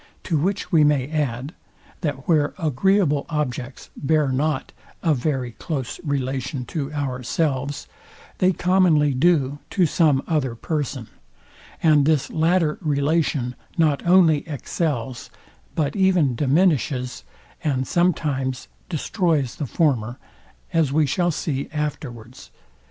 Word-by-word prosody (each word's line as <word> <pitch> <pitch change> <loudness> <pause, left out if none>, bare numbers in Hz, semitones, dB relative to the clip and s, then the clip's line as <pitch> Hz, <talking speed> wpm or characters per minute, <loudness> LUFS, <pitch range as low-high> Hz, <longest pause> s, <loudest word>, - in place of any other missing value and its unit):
To 170 - -1
which 195 +7 -1
we 160 -4 +5
may 145 -3 +2
add, 140 -1 -2 0.5
that 145 -6 -4
where 150 -3 +2
agreeable 160 -1 +1
objects 135 -4 -4
bear 150 -1 +1
not 135 +2 -1 0.3
a 165 -3 +3
very 130 -2 -1
close 135 0 -5
relation 135 -2 -2
to 145 -3 -2
ourselves, 140 0 -2 0.5
they 185 0 +4
commonly 175 -6 +3
do 145 -1 +2
to 185 - +2
some 150 -4 +2
other 140 -7 0
person; 135 -3 -3 0.8
and 150 -3 +5
this 155 -4 +1
latter 165 -1 +2
relation 145 -4 0 0.2
not 155 -4 +2
only 175 -4 +5
excels, 140 -4 -3 0.5
but 150 -3 0
even 185 -9 +3
diminishes, 140 -2 +1 0.4
and 135 -4 0
sometimes 145 -7 0 0.2
destroys 160 - 0
the 145 - -3
former, 125 -6 0 0.6
as 160 -5 +2
we 155 +1 +3
shall 175 +5 +1
see 145 -4 -2
afterwards. 130 - -5
150 Hz, 115 wpm, -23 LUFS, 130-160 Hz, 0.8 s, we